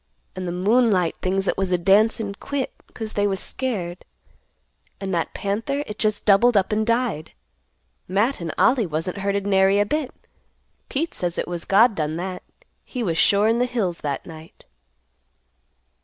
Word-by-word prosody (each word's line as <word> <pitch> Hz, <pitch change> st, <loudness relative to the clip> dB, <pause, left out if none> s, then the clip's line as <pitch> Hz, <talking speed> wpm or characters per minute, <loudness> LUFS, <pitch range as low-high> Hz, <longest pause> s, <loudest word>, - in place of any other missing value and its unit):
And 185 Hz, -1 st, -4 dB
the -, -, -2 dB
moonlight 195 Hz, -1 st, +2 dB
things 190 Hz, +1 st, 0 dB
that -, -, -1 dB
was 190 Hz, -1 st, -1 dB
a 180 Hz, -, +3 dB
dancin' 205 Hz, +3 st, +3 dB
quit 270 Hz, +6 st, -4 dB, 0.2 s
'cause 220 Hz, -2 st, -6 dB
they 205 Hz, 0 st, +1 dB
was 195 Hz, -1 st, -1 dB
scared; 190 Hz, -10 st, -3 dB, 1.0 s
and 195 Hz, -1 st, -4 dB
that 170 Hz, -1 st, -2 dB
panther 225 Hz, +9 st, -2 dB
it 210 Hz, 0 st, -8 dB
just 215 Hz, -1 st, 0 dB
doubled 215 Hz, +3 st, +5 dB
up 190 Hz, +1 st, +1 dB
and 215 Hz, +1 st, +1 dB
died. 230 Hz, -9 st, -1 dB, 0.7 s
Matt 205 Hz, +6 st, 0 dB
and 165 Hz, -2 st, -3 dB
Ollie 235 Hz, -6 st, +3 dB
wasn't 165 Hz, +5 st, -3 dB
hurted 200 Hz, 0 st, -1 dB
nary 195 Hz, 0 st, +4 dB
a 205 Hz, -, +3 dB
bit. 295 Hz, +3 st, -1 dB, 0.8 s
Pete 320 Hz, +5 st, -2 dB
says 175 Hz, -1 st, -3 dB
it -, -, -2 dB
was 175 Hz, -1 st, -4 dB
God 220 Hz, +4 st, +5 dB
done 155 Hz, -3 st, -2 dB
that; 180 Hz, +2 st, -4 dB, 0.4 s
He 250 Hz, -3 st, -5 dB
was 165 Hz, -5 st, 0 dB
sure 205 Hz, +1 st, +4 dB
in 230 Hz, +1 st, +2 dB
the 250 Hz, -, +2 dB
hills 200 Hz, -9 st, -2 dB
that 140 Hz, -2 st, -3 dB
night." 160 Hz, -1 st, -13 dB
200 Hz, 170 wpm, -23 LUFS, 180-225 Hz, 1.0 s, doubled